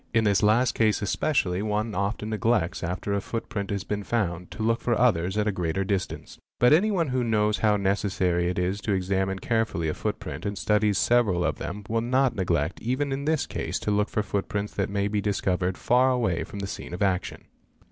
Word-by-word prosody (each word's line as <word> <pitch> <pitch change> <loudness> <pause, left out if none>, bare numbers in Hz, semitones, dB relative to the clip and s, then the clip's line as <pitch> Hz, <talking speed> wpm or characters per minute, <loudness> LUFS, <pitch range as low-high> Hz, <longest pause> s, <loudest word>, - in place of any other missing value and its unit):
In 115 - +4
this 100 -2 +3
last 115 +4 +3
case 110 -1 +2
especially 100 -5 0
one 105 +1 -1
often 100 +3 -2
neglects, 105 -4 0
after 90 +4 -2
a 100 - 0
footprint 100 -2 -4
has 100 -2 -2
been 105 0 -3
found, 90 -6 -1
0 110 - -3
look 115 +1 +1
for 120 -2 +1
others 95 -5 +2
at 105 0 +1
a - - +2
greater 90 0 -1
distance. 95 -1 -3 0.2
But 125 +3 +5
anyone 180 -2 +3
who 130 -1 0
knows 105 -2 +1
how 105 -1 +3
lecessar'y 95 -3 0
it 90 - -3
is 95 +3 -1
to 105 - -1
examine 95 0 0
carefully 110 -7 -1
a - - -1
footprint - - -4
and 100 0 -3
studies 105 0 +2
several 105 -8 +3
of - - -1
them 105 +1 -5
will 115 +1 0
not 130 +2 +2
neglect 85 -3 -1
even 130 +4 -1
in 135 +1 -3
this 155 -1 +1
case - - -3
to 105 - -1
look 105 +1 +1
for 105 - -1
footprints 100 0 -3
that 100 - -1
may 100 0 0
be 105 0 -1
liscovered 95 -2 0
far 125 +2 +3
away 115 -9 0
from - - -9
the 95 - -3
scene 90 - -6
of 90 - -1
action. 95 -2 -1
105 Hz, 210 wpm, -26 LUFS, 95-115 Hz, 0.2 s, But